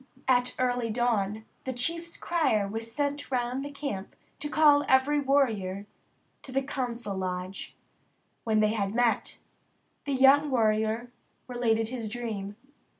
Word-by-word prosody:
At 250 -1 +2
early 245 -2 0
dawn 220 -2 0 0.2
the 260 - -3
chief's 335 +7 0
crier 275 -12 +1
was 225 +3 -5
sent 285 +2 -2
round 250 +1 -1
the 285 - -5
camp 280 -9 -5 0.2
to 295 - -3
call 295 -1 +5
every 265 +3 +4
warrior 220 -9 +1 0.6
to 265 - -11
the 270 +1 0
council 240 -6 -4
lodge. 185 0 -4 0.7
When 215 -1 +2
they 215 0 +3
had 200 -1 -2
met, 240 -1 +1 0.7
the 280 - -1
young 270 +3 +5
warrior 220 -1 +1 0.4
related 225 -3 0
his 235 -4 -4
dream. 210 -4 -5
245 Hz, 135 wpm, -28 LUFS, 215-270 Hz, 0.7 s, call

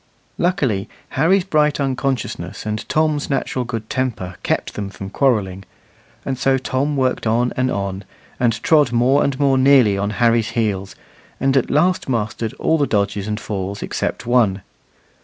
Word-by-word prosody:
Luckily 135 - 0 0.2
Harry's 175 +7 +2
bright 150 -5 +1
unconsciousness 130 -9 -2
and 105 0 -4
Tom's 155 -2 +1
natural 130 -2 -1
good 115 -2 -5
temper 115 -9 -3
kept - - -1
them 100 -2 -4
from 95 0 -8
quarrelling; 100 -9 +1 0.6
and 130 -2 -3
so 135 +1 +3
Tom 135 +3 -1
worked 130 -3 0
on 120 +3 +1
and 130 0 +1
on, 100 -2 -3 0.4
and 115 -2 0
trod 150 -6 +4
more 125 +4 +3
and 140 -1 -1
more 135 -2 +3
nearly 130 -7 +5
on 100 +1 -1
Harry's 115 -2 +3
heels, 100 -4 -1 0.4
and 135 0 +1
at 135 - +2
last 170 +2 +1
mastered 115 -1 -2
all 160 0 +1
the 145 - +2
dodges 100 -1 -1
and 105 0 -2
falls 100 -1 -4
except - - -3
one. 110 -6 +2
125 Hz, 160 wpm, -20 LUFS, 105-135 Hz, 0.6 s, nearly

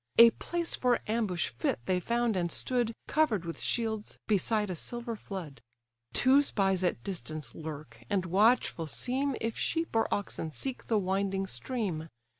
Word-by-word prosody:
A 235 0 +10
place 340 +7 -2
for 250 -1 +3
ambush 210 -6 0
fit 115 0 -1
they 185 -1 +2
found, 235 +3 +1
and 175 -2 0
stood, 245 -3 0 0.2
Cover'd 240 - +2
with 165 - -5
shields, 220 -3 -1
beside 210 0 +2
a - - -3
silver 235 +6 -3
flood. 185 -9 -7 0.5
Two 265 +3 +5
spies 195 -8 +1
at 175 -10 0
distance 155 -8 -4
lurk, 145 -8 -8
and 195 -3 +1
watchful 195 -2 +3
seem 260 - 0
If 230 0 -2
sheep 330 -6 -1
or 225 - +2
oxen 180 -5 -1
seek 265 - -4
the 225 - +2
winding 195 0 0
stream. 175 - -3
205 Hz, 155 wpm, -30 LUFS, 175-235 Hz, 0.5 s, A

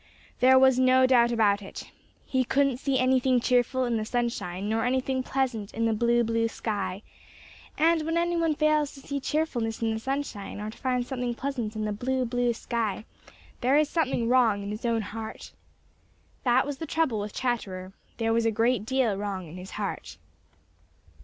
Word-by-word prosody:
There 260 +1 +6
was 265 -1 +5
no 260 0 +5
doubt 240 -2 +4
about 205 -3 +2
it. 195 - -9 0.3
He 260 -1 +1
couldn't 275 0 +1
see 270 0 0
anything 255 0 +3
cheerful 250 +1 +1
in 235 -2 0
the 215 - -1
sunshine 215 -5 -2
nor 225 +1 0
anything 260 +1 0
pleasant 255 -6 -2
in 230 - 0
the 225 - +2
blue, 235 +2 +2
blue 230 0 +1
sky, 200 -3 -4 0.7
and 330 +1 +3
when 325 +2 -1
any 345 0 +1
one 330 -2 +1
fails 305 -1 +1
to - - -11
see 280 0 -4
cheerfulness 255 -7 -1
in 225 -1 +1
the 220 - -3
sunshine 265 -6 -4
or 210 +1 -5
to - - -15
find 250 -2 0
something 245 -2 -3
pleasant 240 -5 -3
in 215 0 -2
the 210 - -1
blue, 255 +4 -1
blue 245 0 +1
sky, 225 -2 -3 0.5
there 260 +4 +3
is 305 -1 +3
something 265 -8 0
wrong 230 -5 +3
in 200 - -5
his 210 +3 -6
own 230 -2 +1
heart. 220 +1 -7 0.9
That 250 +1 +4
was 285 -1 -5
the 320 - -5
trouble 295 -9 0
with 205 0 -5
Chatterer. 195 -7 -3 0.2
There 225 -1 +1
was 230 0 +2
a - - +2
great 225 0 +1
deal 260 -5 +1
wrong 195 -3 -4
in 155 - -11
his 185 +1 -9
heart. - - -5
240 Hz, 185 wpm, -27 LUFS, 220-265 Hz, 0.9 s, There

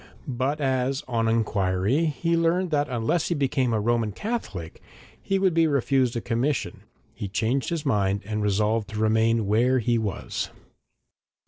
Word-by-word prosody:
But 135 +3 -1
as, 130 -1 0
on 115 -2 0
inquiry, 110 - +1
he 165 +3 0
learned 170 +2 +1
that 145 -1 +1
unless 125 +7 0
he 175 - 0
became 135 -3 +1
a 110 - +1
Roman 115 0 +1
Catholic 100 - -5 0.4
he 195 - 0
would 190 -2 +2
be 165 0 +4
refused 135 -3 +1
a 115 - -1
commission, 125 +5 -1 0.3
he 100 - -5
changed 115 +7 -1
his 165 -3 -3
mind 100 -6 +1
and 105 +1 -2
resolved 105 +1 +1
to 105 +1 -5
remain 110 0 +2
where 120 +6 +3
he 120 -1 +1
was. 105 -5 -3
120 Hz, 155 wpm, -25 LUFS, 110-145 Hz, 0.4 s, be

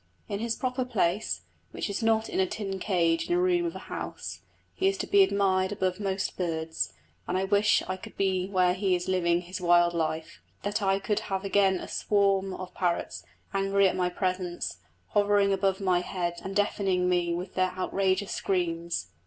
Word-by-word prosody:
In 200 -1 -3
his 230 0 -1
proper 255 0 -1
place, 210 -5 0 0.3
which - - -4
is 200 +1 -3
not 225 0 +2
in - - -2
a 190 - +3
tin 195 -1 -4
cage 170 - +1
in 350 - +3
a - - +2
room 360 -1 +2
of 335 - -5
a - - -8
house, - - -6 0.3
he 380 - +1
is 390 0 +1
to - - -2
be 400 0 +5
admired 195 - +2
above 185 -1 -1
most 195 -1 -2
birds; 160 - -2 0.3
and 180 - 0
I 190 - +1
wish 205 +2 +3
I 185 0 -2
could - - -12
be 190 -2 +1
where 185 -2 +3
he 185 0 +1
is 180 0 -3
living 175 -2 +2
his 180 +2 -7
wild 175 0 +4
life; 160 -1 -3 0.2
that 205 +1 -1
I 195 -1 +2
could 205 +1 -1
have 195 0 -2
again 195 -1 +3
a - - -7
swarm 195 -2 +1
of 185 -1 -8
parrots, 170 - -1 0.3
angry 195 0 +3
at - - 0
my 180 -1 +1
presence, 180 - -2 0.3
hovering 205 -1 +3
above 195 0 +1
my 185 -3 +2
head 175 -1 -3
and 195 0 -5
deafening 195 -3 +1
me 175 -1 +1
with 180 +2 -5
their 185 -1 +1
outrageous 190 +1 0
screams. 170 - -1
190 Hz, 195 wpm, -28 LUFS, 180-200 Hz, 0.3 s, be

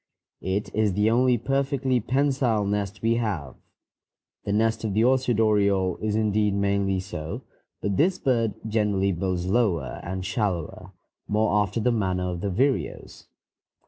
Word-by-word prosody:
It 95 +2 -2
is 105 -2 +1
the 105 +3 +2
only 125 +1 +3
perfectly 135 +1 0
pensile 130 -3 +1
nest 100 +1 -2
we 115 +1 +2
have. 95 - -2 0.9
The 100 - -1
nest 110 +2 +1
of 105 -3 -2
the 110 - +3
orchard 125 -2 +2
oriole 100 -4 +2
is 105 -1 -2
indeed 105 -1 +1
mainly 100 -1 +1
so, 80 -4 -6 0.4
but 100 -2 0
this 180 +4 +3
bird 115 - 0
generally 105 -3 +1
builds 90 0 -2
lower 95 - 0
and 95 +1 -5
shallower, 95 -3 -3 0.3
more 105 0 +2
after 105 +3 -2
the 125 +3 +2
manner 95 -5 0
of 85 -1 -5
the 100 - -1
vireos. 130 +8 -2
105 Hz, 145 wpm, -25 LUFS, 95-115 Hz, 0.9 s, only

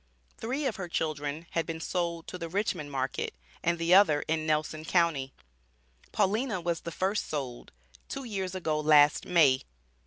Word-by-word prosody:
Three 265 +6 -2
of 245 -5 -1
her 185 -2 -4
children 155 -1 -2
had 165 - -1
been 165 -1 -4
sold 170 -1 -2
to 180 - -7
the 165 -1 -5
Richmond 180 -6 -2
market 135 - -2 0.3
and 170 +1 +1
the 165 +1 +2
other 185 -7 +6
in 155 0 -1
Nelson 155 0 0
county. 160 -6 +1 0.8
Paulina 215 +1 +1
was 170 -1 -2
the 170 - -6
first 195 +4 -1
sold, 135 -5 -5 0.4
two 275 - -4
years 190 -6 -3
ago 160 -4 -1
last 150 -1 +5
May. 150 -7 +5
165 Hz, 160 wpm, -29 LUFS, 150-185 Hz, 0.8 s, other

